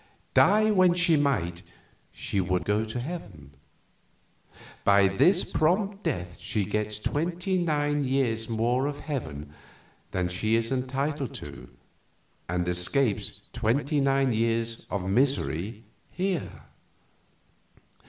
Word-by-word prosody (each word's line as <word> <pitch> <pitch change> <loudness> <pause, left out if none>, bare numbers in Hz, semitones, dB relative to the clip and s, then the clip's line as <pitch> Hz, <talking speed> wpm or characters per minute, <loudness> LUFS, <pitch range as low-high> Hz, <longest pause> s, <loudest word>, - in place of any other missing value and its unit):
Die 215 +1 +5
when 185 -3 +4
she 170 -2 +4
might, 110 - 0 0.5
she 100 - -2
would 90 -1 -1
go 105 +3 +1
to 110 +2 -4
heaven. 120 - -7 1.3
By 100 -1 +5
this 175 - +4
prompt 195 +7 0
death 90 - -3
she 105 -3 -1
gets 105 0 -2
twenty 175 - -1
nine 145 -3 +1
years 125 -4 0
more 120 +4 +1
of 145 0 -5
heaven 75 - -5 0.6
than 90 -1 -1
she 110 +5 0
is 115 +1 0
entitled 135 +1 -2
to, - - -9 0.8
and 90 0 -1
escapes 100 +6 -1
twenty 140 +6 +1
nine 135 -2 +2
years 115 0 -1
of 95 -2 -3
misery 110 - 0 0.3
here." 185 -4 -3
125 Hz, 115 wpm, -27 LUFS, 100-150 Hz, 1.3 s, Die